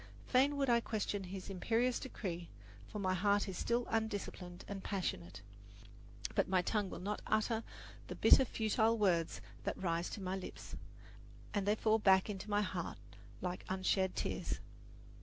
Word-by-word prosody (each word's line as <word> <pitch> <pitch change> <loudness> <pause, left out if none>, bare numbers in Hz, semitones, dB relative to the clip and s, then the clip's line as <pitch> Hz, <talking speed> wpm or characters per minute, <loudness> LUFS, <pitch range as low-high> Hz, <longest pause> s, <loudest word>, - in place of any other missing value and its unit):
Fain 280 +3 +3
would 275 -1 +2
I 235 -1 +5
question 205 -3 -2
his 185 +1 -6
imperious 235 +6 +1
decree, 175 -9 -5 0.4
for - - -6
my 190 -2 +1
heart 200 +2 +2
is 190 - -4
still 235 +6 0
undisciplined 205 -5 -3
and 195 -1 -5
passionate; 100 - -3 0.9
but - - +2
my 185 -1 +3
tongue 205 0 0
will - - -6
not 205 +3 -3
utter 220 +1 +1 0.4
the - - -5
bitter, 265 - +7
futile 225 -1 +2
words 175 -6 +2 0.2
that - - -2
rise 170 -2 -1
to - - -6
my 190 -1 -2
lips, 190 - -7 0.8
and 205 -1 0
they 210 - +4
fall 220 0 +3
back 190 0 +5
into 195 +1 -6
my 205 0 +3
heart 185 -3 -3 0.4
like 180 0 -3
unshed 190 0 +1
tears. - - -2
200 Hz, 160 wpm, -36 LUFS, 185-220 Hz, 0.9 s, bitter